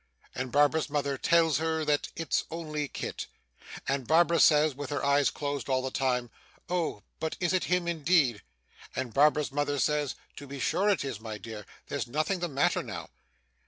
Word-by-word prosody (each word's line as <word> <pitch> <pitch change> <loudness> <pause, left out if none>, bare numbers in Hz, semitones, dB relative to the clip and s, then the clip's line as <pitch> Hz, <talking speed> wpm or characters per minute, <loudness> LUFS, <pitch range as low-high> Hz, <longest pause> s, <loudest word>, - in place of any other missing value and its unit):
and 130 -1 -4
Barbara's 145 +2 +3
mother 140 -1 0
tells 165 +1 +3
her 160 -1 0
that 150 -1 +1
'it's 165 - -1
only 155 -3 -3
Kit;' - - -5 0.6
and 135 -3 -1
Barbara 170 +1 +4
says 150 -1 +5
(with 145 +2 -6
her 145 -1 -2
eyes 140 0 +4
closed 145 -2 -4
all 130 -1 +1
the 130 - -3
time) 125 -3 0 0.4
'Oh! 165 - -1 0.2
but 160 - -3
is 175 0 +1
it 185 - +1
him 180 -1 +1
indeed?' 155 - +2 0.5
and 130 -3 -3
Barbara's 150 +1 +3
mother 145 0 0
says 150 0 +1 0.2
'To 145 - -8
be 140 0 -7
sure 195 +9 +1
it 195 -8 +1
is, 120 -6 -4
my 110 -1 -6
dear; 105 -1 -9 0.2
there's - - -3
nothing 155 +9 0
the 175 - -1
matter 140 -2 +1
now. - - -7
145 Hz, 180 wpm, -29 LUFS, 135-160 Hz, 0.6 s, says